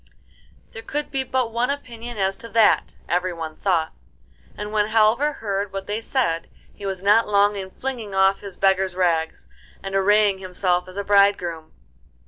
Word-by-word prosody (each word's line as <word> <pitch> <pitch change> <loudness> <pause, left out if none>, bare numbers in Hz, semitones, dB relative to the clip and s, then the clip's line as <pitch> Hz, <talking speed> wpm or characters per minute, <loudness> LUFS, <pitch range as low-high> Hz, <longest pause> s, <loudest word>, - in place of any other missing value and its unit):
There 225 - -8
could 295 +5 -4
be 270 -2 -1
but 255 -2 -1
one 240 +3 0
opinion 240 -4 -6
as 195 -1 0
to 230 - -11
that, 225 -2 +3
everyone 170 -3 -2
thought, 170 -4 0 0.6
and 210 0 -5
when 210 -1 +2
Halvor 225 +7 +3
heard 200 -4 -3
what 195 0 -5
they 210 +3 -3
said 225 -10 -1 0.2
he 200 - -7
was 190 -1 -4
not 210 +2 +4
long 205 0 +3
in 190 -1 -5
flinging 230 -3 -5
off 190 0 +3
his 200 -3 -10
beggar's 190 -1 +2
rags 165 -3 0 0.4
and 195 0 -5
arraying 200 0 +3
himself 180 -1 -1
as 185 +1 -11
a 200 - -2
bridegroom. 195 -6 +2
200 Hz, 165 wpm, -22 LUFS, 185-225 Hz, 0.6 s, not